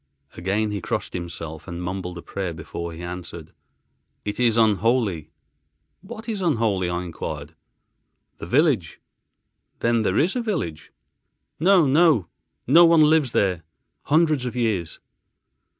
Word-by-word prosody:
Again 100 +4 -1
he 100 -2 -3
crossed - - -3
himself 80 -2 -6
and 85 -2 -6
mumbled 90 -1 -4
a 85 - -9
prayer, 95 -4 -4
before 80 +2 -6
he 85 +1 -9
answered, 85 -2 -8 0.7
"It 105 +2 -4
is 120 -2 +3
unholy." 110 - +2 0.7
"What 220 +4 -10
is 215 -4 -3
unholy?" 110 - +1
I 90 +1 -2
enquired. 80 -3 -6 0.9
"The - - -7
village." 130 - +1 0.8
"Then 115 -1 +2
there 100 -2 0
is 175 - +2
a 250 - 0
village?" 135 - -4 0.7
"No, 180 0 +5
no. 145 - +4 0.4
No 165 +7 +7
one 165 -2 +6
lives 150 -4 +3
there 90 -4 +1 0.4
hundreds 155 -4 +2
of 125 - -5
years." 105 -9 -1
105 Hz, 135 wpm, -23 LUFS, -, 0.9 s, No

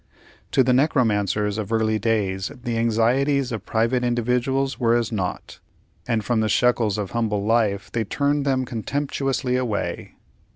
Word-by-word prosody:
To 130 - +5
the 125 0 +2
necromancers 105 - +1
of 105 0 -5
early 110 -1 +1
days 100 -4 -1
the 120 -2 -2
anxieties 125 +4 +1
of 110 -3 -5
private 115 +3 +1
individuals 125 +3 0
were 120 -2 +3
as 120 -2 0
naught, 95 -5 -4 0.5
and 110 -3 0
from 120 0 +1
the 110 0 +1
shekels 115 -2 +2
of 100 -3 -4
humble 105 -4 -1
life 105 -3 +1
they 115 - -1
turned 145 +6 0
them 130 -2 0
contemptuously 135 +1 -2
away. 120 -5 -3
115 Hz, 150 wpm, -23 LUFS, 110-130 Hz, 0.5 s, To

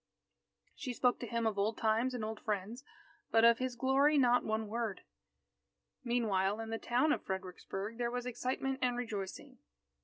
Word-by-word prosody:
She 255 - -5
spoke 245 0 +2
to 240 - -5
him 230 +1 -1
of 215 -2 0
old 215 +3 +1
times 230 +3 +1
and 225 -3 -3
old 220 0 -5
friends, 215 +4 -3 0.5
but 225 0 +5
of 235 0 +6
his 255 -1 -2
glory, 270 +4 +3
not 245 -2 +4
one 220 0 -1
word. 225 -2 -3 1.0
Meanwhile, 215 -5 +1
in 225 0 -5
the 225 - -2
town 255 +6 +2
of - - +1
Fredericksburg 195 +3 -5
there 240 -1 +1
was 245 0 -3
excitement 260 +2 -2
and 245 -1 +1
rejoicing. 230 +3 -5
235 Hz, 165 wpm, -34 LUFS, 215-250 Hz, 1.0 s, of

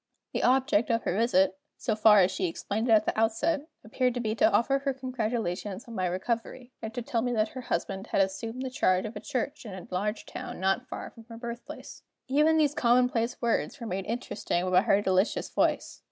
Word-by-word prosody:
The - - -1
object 255 -3 +3
of 230 -1 +1
her 175 - -1
visit 275 +6 +2 0.2
so 225 -5 -1
far 215 -1 +7
as 185 - +3
she 185 - -1
explained 215 +7 -3
it - - +4
at 215 -1 +5
the - - -1
outset 285 +8 +1 0.2
appeared 250 +3 0
to - - -1
be 220 -2 -1
to 220 0 +3
offer 235 +7 +2
her 275 -1 -2
congratulations 225 -5 -3
on 235 - -9
my 185 -4 0
recovery, 230 +7 -3
and 220 -1 -5
to 245 - -3
tell 235 -3 -1
me 245 +1 -1
that 215 -1 +1
her 260 - -7
husband 195 -1 -3
had - - 0
assumed 225 +6 -1
the 260 - -4
charge 185 -7 +2
of 215 +1 -6
a - - -4
church 280 +5 -3
in 210 -5 -7
a 185 - -9
large 210 +4 -2
town - - -7
not 195 +7 0
far - - -7
from 230 -1 -15
her 230 0 -10
birthplace. 235 0 -8 0.3
Even 300 +4 +4
those 295 -2 +3
commonplace 245 -2 +2
words 235 -1 0
were 235 - -6
made 190 -2 -3
interesting 210 -6 -2
by 180 - +6
her 200 +1 +2
delicious 190 +2 +1
voice. - - 0
230 Hz, 215 wpm, -28 LUFS, 205-250 Hz, 0.3 s, far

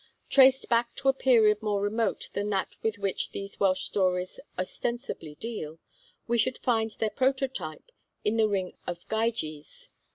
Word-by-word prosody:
Traced 265 -1 +6
back 235 0 +1
to 270 - +2
a - - +5
period 225 -5 +4
more 210 -2 0
remote 205 +1 -1
than 205 +1 -1
that 195 -2 0
with 220 -1 -1
which 200 -2 -1
these 195 0 -6
Welsh 190 -2 +2
stories 185 -2 0 0.2
ostensibly 185 - -4
deal, 165 -7 -5 0.5
we 235 0 +1
should 255 +3 +2
find 225 -3 +1
their 215 0 -2
prototype 260 - -1 0.3
in 215 +2 +2
the 220 -1 +4
ring 190 -3 -1
of 175 -1 -5
Gyges. 220 -10 -2
215 Hz, 155 wpm, -28 LUFS, 190-235 Hz, 0.5 s, Traced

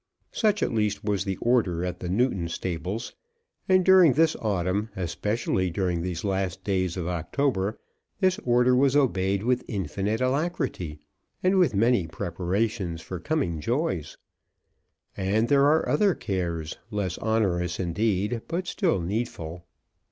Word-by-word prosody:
Such 210 -3 +1
at - - -1
least 105 -2 0
was 105 -2 0
the 95 -2 -2
order 100 -8 +1
at 90 0 -4
the 90 - -5
Newton 95 -4 +1
stables; 90 +5 -4 0.6
and 185 -1 +4
during 185 -6 +7
this 160 +3 +3
autumn, 100 0 -1
especially 95 +1 -1
during 90 -1 -1
these 85 -1 -4
last 95 -2 -2
days 95 -3 0
of 85 -2 -3
October, 95 - -1 0.4
this 185 -2 +2
order 125 +1 +3
was 135 +1 +3
obeyed 100 -8 +2
with 125 +1 +1
infinite 100 +2 -2
alacrity, 130 - -1 0.5
and 185 +1 +4
with 160 - +3
many 115 -4 +3
preparations 95 +1 -2
for 90 - -6
coming 100 - -1
joys. 120 - -2 1.0
And 105 +4 +1
there 140 0 +5
are 155 +2 +3
other 205 -4 +3
cares, 85 -4 -3
less 100 -4 -2
onerous 95 -6 0
indeed, 105 +5 0
but 175 +2 -2
still 175 - 0
needful. 85 -4 -4
100 Hz, 135 wpm, -26 LUFS, 90-125 Hz, 1.0 s, during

